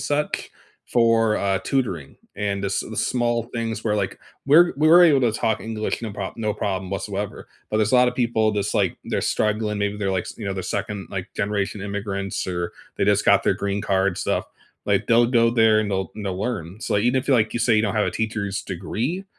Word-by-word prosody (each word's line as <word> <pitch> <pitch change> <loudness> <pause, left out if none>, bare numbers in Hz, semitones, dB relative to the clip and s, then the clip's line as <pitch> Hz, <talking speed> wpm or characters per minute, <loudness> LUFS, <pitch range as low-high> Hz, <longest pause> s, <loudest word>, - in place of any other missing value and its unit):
such 145 +1 -2 0.4
for, 115 -2 +3
uh, 95 -1 0
tutoring. 100 - -2 0.2
And 100 0 -2
the - - 0
s 95 - 0
the - - -7
small 120 -1 0
things 115 -2 -3
were, 105 -2 +1
like, 100 -2 -2 0.3
were 170 +5 +6
we 155 +1 +4
were 175 +2 +8
able 145 -5 +5
to 120 -3 +3
talk 110 0 0
English 110 -1 -3
no 110 -3 -4
prob 100 -1 -5
no 110 -2 -1
problem 95 -2 -3
whatsoever. 100 0 -4 0.2
But 110 - 0
there's 110 +1 +1
a - - +5
lotta 125 0 +5
people 115 -3 +1
that's, 105 0 -1
like - - +1
they're - - -1
struggling, 105 0 0
maybe 100 0 -1
they're, 100 -2 -1
like, 95 -2 -1
s - - -8
you 105 - -5
know, 100 - -2
they're 95 - -4
2nd, 100 +1 -4
like, 95 -2 -4
generation 100 0 -1
immigrants 100 -1 -3
or 90 -2 -3 0.2
they - - +1
just - - +2
got - - +5
their - - +3
green 100 0 -2
card 95 -1 +1
stuff. - - -1 0.4
Like, - - +1
they'll 115 +1 +5
go 115 -1 +3
there 115 -2 +4
and 105 -1 -2
they'll 95 -1 -2
and 105 - -7
they'll 95 -1 -3
learn. 100 -4 -4
So, - - -2
like, 100 - +2
even 125 +2 +3
if 135 - -12
you, 135 - +5
like, 110 -3 +2
you 120 - -1
say 120 0 +3
you 105 - +3
don't 105 -2 -1
have 105 -1 +2
a - - 0
teacher's 110 -3 -2
degree, 120 - -3
105 Hz, 230 wpm, -23 LUFS, 100-115 Hz, 0.4 s, were